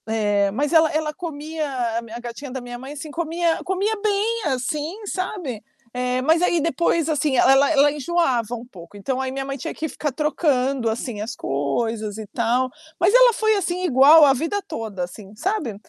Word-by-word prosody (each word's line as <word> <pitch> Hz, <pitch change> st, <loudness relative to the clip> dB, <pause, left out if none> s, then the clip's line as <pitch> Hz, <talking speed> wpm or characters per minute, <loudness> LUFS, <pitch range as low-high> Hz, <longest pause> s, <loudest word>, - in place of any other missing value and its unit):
É, 205 Hz, -2 st, +1 dB
mas 285 Hz, -, -1 dB
ela 320 Hz, -1 st, +6 dB
ela 310 Hz, 0 st, -1 dB
comia, 315 Hz, -2 st, -5 dB
a 240 Hz, -4 st, -1 dB, 0.2 s
a -, -, -8 dB
gatinha 240 Hz, +3 st, -7 dB
da 260 Hz, -, -4 dB
minha 245 Hz, -1 st, -8 dB
mãe, 265 Hz, +3 st, -8 dB
assim, 300 Hz, +1 st, -8 dB
comia 335 Hz, +1 st, -1 dB
comia 390 Hz, +4 st, 0 dB
bem, 430 Hz, +2 st, 0 dB
assim, 300 Hz, -, -3 dB
sabe, 365 Hz, -, -4 dB, 0.3 s
eh, 250 Hz, 0 st, -1 dB
mas, 320 Hz, +5 st, +3 dB
aí, 345 Hz, -2 st, +2 dB
depois, 330 Hz, 0 st, +1 dB
assim, 295 Hz, -2 st, +1 dB
ela 260 Hz, -, +5 dB
ela 275 Hz, +1 st, +5 dB
ela 290 Hz, -1 st, +4 dB
enjoava 275 Hz, -7 st, 0 dB
um 235 Hz, +1 st, -8 dB
pouco. 180 Hz, -5 st, -14 dB
Então, 255 Hz, +6 st, -3 dB
aí, 265 Hz, 0 st, -2 dB
minha 270 Hz, +1 st, -4 dB
mãe 275 Hz, 0 st, -5 dB
tinha 270 Hz, -, -5 dB
que 315 Hz, -, -4 dB
ficar 295 Hz, 0 st, -3 dB
trocando, 275 Hz, -4 st, 0 dB
assim, 225 Hz, -1 st, -4 dB
as 215 Hz, +3 st, -4 dB
coisas, 210 Hz, -, -2 dB
e 220 Hz, -, -6 dB
tal. 240 Hz, +4 st, 0 dB, 0.3 s
Mas 365 Hz, +5 st, +3 dB
ela -, -, +7 dB
foi, 435 Hz, 0 st, +2 dB
assim, 365 Hz, -2 st, -2 dB
igual 300 Hz, 0 st, +7 dB
a 285 Hz, -, +7 dB
vida 330 Hz, +9 st, -2 dB
toda, 210 Hz, -5 st, -5 dB
assim, 195 Hz, +3 st, -9 dB
sabe. 310 Hz, -, -2 dB
275 Hz, 195 wpm, -22 LUFS, 240-330 Hz, 0.3 s, ela